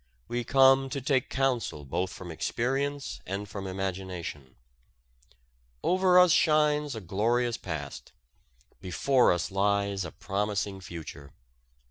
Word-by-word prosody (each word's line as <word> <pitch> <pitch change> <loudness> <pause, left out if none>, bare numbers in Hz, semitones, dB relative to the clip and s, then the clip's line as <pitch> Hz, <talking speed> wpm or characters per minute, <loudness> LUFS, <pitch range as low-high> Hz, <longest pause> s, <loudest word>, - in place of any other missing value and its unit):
We 120 0 -2
come 135 +1 +5
to 140 - -3
take 135 0 0
counsel 125 - -1
both 90 +7 -2
from 90 -1 -8
experience 135 - -2
and 100 +2 -4
from 95 0 -6
imagination. 95 -7 -5 1.3
Over 185 0 +4
us 180 -1 +7
shines 150 -3 +3
a 110 - -6
glorious 115 +6 0
past, 75 -6 -6 0.7
before 125 +9 +3
us 90 +1 -1
lies 100 0 +1
a 85 - -6
promising 100 -1 -2
future. 80 -5 -9
100 Hz, 115 wpm, -28 LUFS, 90-135 Hz, 1.3 s, us